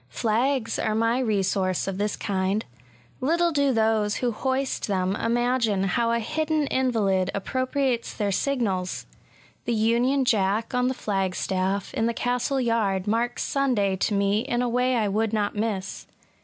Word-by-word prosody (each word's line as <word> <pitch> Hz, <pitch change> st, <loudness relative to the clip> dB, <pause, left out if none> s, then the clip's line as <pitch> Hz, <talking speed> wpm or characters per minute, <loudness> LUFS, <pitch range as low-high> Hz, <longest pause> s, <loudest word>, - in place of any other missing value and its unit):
Flags 230 Hz, -, 0 dB
are 215 Hz, -1 st, 0 dB
my 230 Hz, +3 st, +2 dB
resource 195 Hz, -6 st, 0 dB
of 195 Hz, 0 st, -3 dB
this 210 Hz, 0 st, -1 dB
Mnd. 195 Hz, +2 st, -1 dB, 0.6 s
Little 335 Hz, +6 st, +2 dB
do 285 Hz, -3 st, +2 dB
those 220 Hz, -2 st, +1 dB
who 245 Hz, -1 st, 0 dB
hoist 265 Hz, +4 st, -1 dB
them 190 Hz, -1 st, 0 dB
imagine 235 Hz, -3 st, +1 dB
how 230 Hz, +5 st, +1 dB
a 235 Hz, -, +2 dB
hidden 310 Hz, +5 st, 0 dB
invalid 205 Hz, -8 st, +1 dB
appropriates 255 Hz, +3 st, -1 dB
their 205 Hz, -2 st, -2 dB
signals! 195 Hz, -7 st, -1 dB, 0.6 s
The 235 Hz, -, 0 dB
Union 240 Hz, +5 st, +2 dB
Jack 215 Hz, 0 st, +1 dB
on 250 Hz, 0 st, +2 dB
the 260 Hz, -, -1 dB
flag 195 Hz, -5 st, -1 dB
staff, 190 Hz, +1 st, -1 dB
in 225 Hz, -, 0 dB
the 235 Hz, -, -1 dB
castle 250 Hz, +2 st, 0 dB
yard, 215 Hz, -6 st, 0 dB
marks 230 Hz, +3 st, 0 dB
Sunday 245 Hz, -9 st, +1 dB
to 205 Hz, -, 0 dB
me 200 Hz, +1 st, +2 dB
in 240 Hz, 0 st, -1 dB
a -, -, 0 dB
way 250 Hz, +2 st, +1 dB
I 220 Hz, -3 st, +1 dB
would 215 Hz, +2 st, 0 dB
not 210 Hz, -1 st, 0 dB
miss. 205 Hz, -3 st, -3 dB
225 Hz, 155 wpm, -25 LUFS, 200-250 Hz, 0.6 s, my